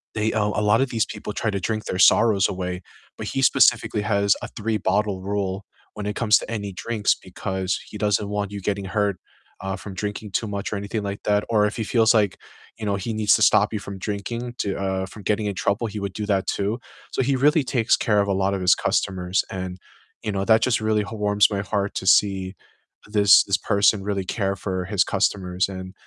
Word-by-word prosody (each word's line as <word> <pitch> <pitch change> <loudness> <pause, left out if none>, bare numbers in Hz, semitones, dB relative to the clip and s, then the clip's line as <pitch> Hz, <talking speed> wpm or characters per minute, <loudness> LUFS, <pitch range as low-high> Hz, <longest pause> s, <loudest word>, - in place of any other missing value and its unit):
they, 110 +1 0
uh 105 -2 +1
A 105 - -1
lot 105 +3 +3
of 135 - 0
these 115 -2 +1
people 105 - -7
try 110 - -1
to 100 - -2
drink 110 +3 -3
their 90 - -3
sorrows 105 -2 +5
away. 90 0 -4 0.4
But - - -5
he 135 - -2
specifically 105 -4 +3
has 100 -1 +2
a - - -5
three-bottle 105 -3 -1
rule 100 -1 -3 0.3
when 105 -1 -6
it 105 - -3
comes 110 -2 +4
to - - -8
any 100 -3 -4
drinks, 110 +1 0
because 95 -1 -3
he - - -8
doesn't 105 -1 0
want 105 -1 -2
you 100 - -6
getting 100 0 -2
hurt, 100 -2 0 0.4
uh, 95 0 -3
from 95 0 -9
drinking 105 +1 -5
too 110 - -1
much 100 0 -4
or - - -1
anything 100 +1 -4
like 100 0 -5
that. 105 0 +2
Or 105 -2 +3
if 105 - -2
he 110 - -1
feels 115 0 +3
like, 105 -4 +2 0.4
you 110 - -6
know, 100 -1 0
he 110 +4 -4
needs 110 -1 +3
to - - -1
stop - - +4
you 105 - -1
from 100 -1 -8
drinking 115 +5 -4
to, 100 - -1
uh, 95 -1 -2
from 100 +1 -12
getting 105 0 0
in 100 - -3
trouble, 100 +5 0
he 105 0 -6
would 100 -2 -4
do 105 - -4
that 95 -2 0
too. 105 +5 -1 0.3
So - - 0
he 135 +1 +1
really 150 +2 +3
takes 120 -3 +2
care 105 -2 +2
of 100 - -1
a 100 - +1
lot 95 +1 0
of 95 - -2
his 90 0 +5
customers 90 -1 0
and, 95 -1 -5 0.5
you 105 - -2
know, 95 0 -1
that 110 -1 +5
just 120 -2 +1
really 110 -1 +1
h 100 - -5
warms 105 -1 +3
my 100 - -1
heart 100 0 -2
to 95 - -4
see 95 -1 +3 0.5
this 105 -2 +6
this 100 -2 +1
person 100 0 +2
really 100 -2 -2
care 100 +1 -1
for 95 -1 -3
his 100 -1 +2
customers. 95 -2 0
And 95 0 -7
100 Hz, 230 wpm, -23 LUFS, 95-110 Hz, 0.5 s, this